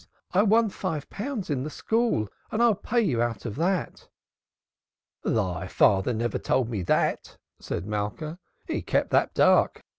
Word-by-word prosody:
I 190 - +4
won 220 +1 +4
five 155 -5 -4
pounds 215 - -4
in 135 -3 0
the 145 - -4
school 225 - 0 0.2
and 215 - -1
I'll 235 -2 +5
pay 235 +4 0
you 135 - +1
out 120 -3 -2
of 110 -3 -4
that." 180 +3 -1 1.1
"Thy 95 -7 -1
father 95 +5 +3
never 115 -1 -1
told 125 -3 0
me 105 -4 -2
that!" 90 - 0 0.2
said - - -4
Malka. 105 - -4 0.3
"He - - -2
kept - - 0
that - - +2
dark. - - +4
150 Hz, 155 wpm, -26 LUFS, -, 1.1 s, I'll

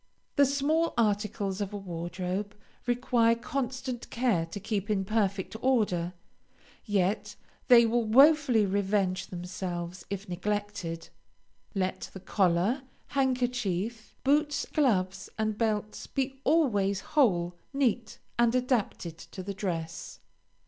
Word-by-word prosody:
The 280 -2 +5
small 295 +4 +1
articles 205 -3 0
of 200 0 -3
a - - -3
wardrobe 180 +2 -4 0.3
require 240 -1 +3
constant 255 0 -4
care 230 -9 +1
to 165 - -6
keep 205 0 -2
in 195 -2 +1
perfect 200 -2 0
order, 200 -9 +1 0.7
yet 200 0 0 0.3
they 235 -2 +8
will 235 +1 +2
wofully 265 -1 +5
revenge 195 -1 0
themselves 180 -1 -5
if 200 +1 -4
neglected. 185 -3 -3 0.7
Let 185 -1 -2
the 190 - -7
collar, 190 +6 +1 0.3
handkerchief, 245 -6 -1
boots, 295 +2 +2
gloves, 195 - +1
and 215 -1 0
belts 215 -1 -1
be 270 0 -3
always 205 - +2
whole, 180 - +3 0.2
neat, 245 -5 0 0.2
and 235 0 +4
adapted 225 - -1
to 190 - -9
the 200 +2 -4
dress. 170 -5 -4
210 Hz, 115 wpm, -29 LUFS, 185-245 Hz, 0.7 s, they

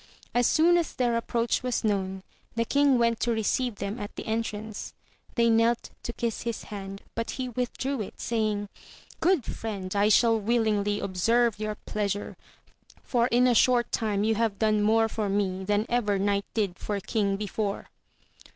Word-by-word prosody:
As 245 0 +3
soon 340 +2 +5
as 335 - -3
their 240 -2 +1
approach 230 0 0
was 250 -2 -1
known 190 -3 -1 0.3
the 230 0 +1
king 280 +1 +3
went 230 -1 +2
to 240 - +1
receive 230 +2 0
them 200 +4 -4
at 205 - -6
the - - -6
entrance. 220 -1 -4 0.4
They 235 -1 +3
knelt 230 +1 +2
to - - -4
kiss 235 -1 -3
his 235 -1 -4
hand, 195 -1 -7
but 230 0 -3
he 255 -1 -3
withdrew 250 +2 -2
it, 200 - -8
saying, 215 -3 -1 0.5
Good 340 -6 +2
friend, 200 -4 -5
I 205 +1 +4
shall 225 +1 +5
willingly 210 -2 +1
observe 225 +4 +1
your 215 0 -2
pleasure, 205 -1 -3 0.7
for 240 -1 +2
in 245 0 +3
a 250 - +4
short 240 +1 +3
time 210 -3 0
you 220 +1 +3
have 220 -2 0
done 215 -1 +2
more 225 +2 +4
for 215 -2 -2
me 195 -1 0
than 205 +2 +1
ever 215 -5 +1
knight 200 0 +1
did 200 -5 -1
for 205 -1 -2
king 200 -1 0
before. 205 0 -3
220 Hz, 170 wpm, -27 LUFS, 205-235 Hz, 0.7 s, soon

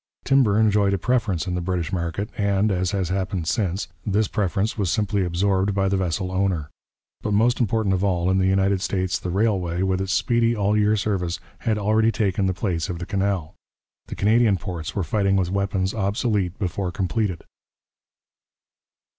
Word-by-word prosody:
Timber 125 -7 +4
enjoyed 105 -2 +3
a - - -1
preference 105 -5 0
in 90 - -3
the 90 - -1
British 90 0 -2
market, 85 +3 -3
and, 100 0 +1
as 90 -1 0
has 95 -4 -1
happened 95 -2 -2
since, 95 -1 -1 0.2
this 105 +1 +1
preference 100 +2 -1
was 100 -5 -1
simply 100 +2 0
absorbed 95 +2 +1
by 95 -1 +1
the 95 - +1
vessel 95 0 -1
owner. 95 -5 -1 0.5
But 105 - -1
most 120 +4 +3
important 110 -3 +1
of 95 +1 0
all, 90 -2 +1
in 95 - +2
the 95 - +2
United 95 0 +2
States 95 -2 -1
the 90 - -5
railway, 95 -3 0
with 95 0 0
its 95 0 -2
speedy, 115 +2 +2
all 105 0 +1
year 105 0 +3
service, 95 -4 -1 0.2
had 110 -3 0
already 110 +2 +2
taken 100 -3 0
the 95 - +1
place 85 -6 -2
of 90 - -3
the 85 - -5
canal. 95 -4 -1 0.5
The - - -6
Canadian 110 0 +3
ports 85 -6 -6
were 100 - 0
fighting 100 +4 +1
with 90 -2 +1
weapons 100 -1 -1
obsolete 105 -3 -1
before 95 -1 -2
completed. 95 0 -2
95 Hz, 180 wpm, -23 LUFS, 90-105 Hz, 0.5 s, Timber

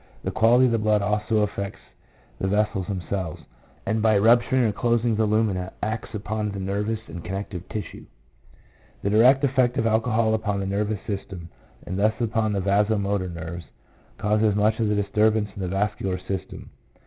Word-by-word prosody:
The - - -2
quality 120 +3 +4
of 125 - +2
the 115 - +1
blood 105 -1 +2
also 105 +1 +1
affects 100 -1 -3 0.6
the 95 - -1
vessels 105 -2 0
themselves, 95 -3 -4 0.4
and 110 0 0
by 110 -1 +4
rupturing 120 +4 +4
or 110 - +2
closing 120 +1 +1
the 110 0 +1
lumina 105 -4 0
acts 110 +1 -3
upon 105 0 -2
the 100 -1 -5
nervous 105 +3 -2
and 85 -6 -8
connective 95 -1 -6
tissue. 105 - -6 1.0
The 100 - 0
direct 125 +6 +5
effect 130 -2 +2
of 115 - +1
alcohol 110 0 +2
upon 105 -2 -1
the 100 - -2
nervous 105 +1 -2
system, 95 -4 -6 0.4
and 95 +2 -4
thus 110 +2 +3
upon 110 -2 0
the 100 - 0
vaso 105 +3 +2
motor 100 -2 -1
nerves, 85 0 -7 0.5
causes 105 0 +2
much 105 +2 +2
of 110 - +1
the 105 - +1
disturbance 105 +1 +2
in 100 - -6
the 95 - -2
vascular 95 0 -1
system. 95 +1 -6
105 Hz, 170 wpm, -24 LUFS, 100-110 Hz, 1.0 s, direct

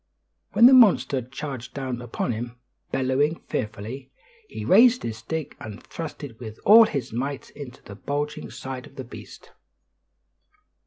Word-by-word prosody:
When 235 - +7
the 260 - +9
monster 205 - +5
charged 130 0 -7
down 130 -3 -4
upon 120 0 -3
him, 120 +2 -5 0.3
bellowing 135 +4 +1
fearfully, 110 +5 -5 0.4
he - - -6
raised 235 +6 +6
his 110 -1 -4
stick 160 +1 -5
and 105 -2 -9
thrust 160 -2 -7
it 120 -6 -9
with 110 -3 -9
all 225 +2 +9
his 130 -5 -4
might 135 +3 -4
into 135 -4 -10
the 100 - -10
bulging 145 +8 -4
side 130 -1 -7
of - - -20
the 135 - -6
beast. 125 - -12
130 Hz, 150 wpm, -25 LUFS, 120-150 Hz, 0.4 s, the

